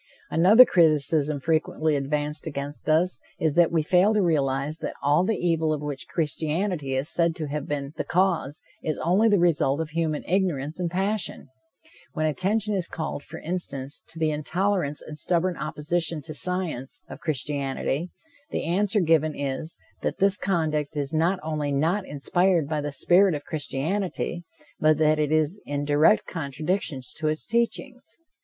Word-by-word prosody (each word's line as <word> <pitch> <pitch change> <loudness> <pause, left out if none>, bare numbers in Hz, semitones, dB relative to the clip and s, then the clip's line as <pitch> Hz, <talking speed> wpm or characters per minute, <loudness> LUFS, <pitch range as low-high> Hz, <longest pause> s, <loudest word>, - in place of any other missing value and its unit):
Another 205 +10 +8
criticism 155 - +3
frequently 155 0 0
advanced 150 +2 -2
against 145 0 -5
us 170 +4 +2 0.2
is 160 -2 +1
that 170 0 +4
we 165 -2 +2
fail 185 +6 +4
to 210 - +3
realize 145 -2 0
that - - -5
all 145 +5 +4
the 215 +3 0
evil 165 -2 +1
of 150 -1 -2
which 145 -2 -5
Christianity 160 -1 -1
is 135 +3 -1
said 170 -1 +1
to 155 - -4
have 150 0 -4
been 140 -1 -3
the - - -1
cause, 170 -5 0 0.2
is 155 - -2
only 195 +7 +3
the 205 - +4
result 160 -5 +2
of 160 -1 -3
human 160 -2 -1
ignorance 165 -5 0
and 175 -2 -1
passion. 195 -2 -2 0.6
When 155 - -1
attention 200 +7 0
is 185 -4 -1
called, 160 -3 -4
for 160 +3 -10
instance, 145 -5 -3
to 165 - -10
the 160 -1 +1
intolerance 155 0 -1
and 155 - -8
stubborn 175 +3 0
opposition 155 +1 -2
to 155 - -6
science, 170 -6 -2
of - - -9
Christianity, 145 +1 -2 0.4
the - - -2
answer 195 +4 +2
given 155 -2 +2
is, 140 +3 -3 0.2
that - - -2
this 195 0 +3
conduct 155 -6 -1
is 145 +1 -2
not 170 +4 +2
only 150 -2 -2
not 165 +8 0
inspired 170 +3 +1
by 150 0 -1
the 145 0 -3
spirit 180 +4 +4
of 145 - -6
Christianity, 170 +4 -2 0.3
but 155 -1 +4
that 155 0 +3
it 150 -1 0
is 155 +5 +1
in 145 0 -2
direct 150 +8 +4
contradiction 155 0 -3 0.2
to 155 - -1
its 155 +1 -1
teachings. 235 +2 -2
155 Hz, 165 wpm, -25 LUFS, 145-180 Hz, 0.6 s, Another